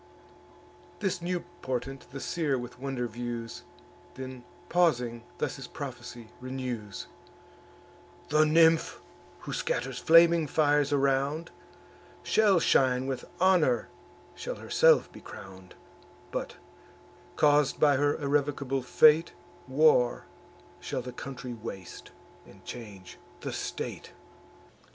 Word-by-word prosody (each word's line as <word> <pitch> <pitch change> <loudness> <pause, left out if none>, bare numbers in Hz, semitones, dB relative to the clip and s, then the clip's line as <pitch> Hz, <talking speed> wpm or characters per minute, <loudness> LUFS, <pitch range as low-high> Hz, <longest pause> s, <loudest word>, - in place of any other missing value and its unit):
This 190 -3 -1
new 175 0 -2 0.2
portent 130 +1 -4
the 135 +2 -7
seer 150 -2 -1
with 125 0 -8
wonder 135 -2 -3
views, 120 0 -6 0.5
Then 130 -1 -8 0.2
pausing, 125 -10 +1 0.2
thus - - -2
his - - -8
prophecy 120 -2 -8
renews: 125 -5 -5 1.2
"The 155 +1 +5
nymph, 160 +1 +4 0.4
who - - -6
scatters - - -2
flaming 165 -1 +6
fires 145 -1 +2
around, 140 +3 +1 0.7
Shall 205 -4 +4
shine 130 -4 +3
with 135 -1 -4
honour, 160 - +3 0.4
shall 70 - -5
herself - - +3
be - - -13
crown'd; 95 -1 -12 0.6
But, - - -4 0.8
caus'd 145 -2 +3
by 145 -2 +5
her 145 +1 +2
irrevocable 140 -2 0
fate, 155 +5 +5 0.3
War 130 -3 +3 0.5
shall 125 - -4
the 125 0 -7
country 125 -1 -7
waste, 110 -5 -9 0.4
and - - -17
change 100 -6 -9 0.2
the - - -4
state." - - -5
135 Hz, 105 wpm, -29 LUFS, 125-155 Hz, 1.2 s, flaming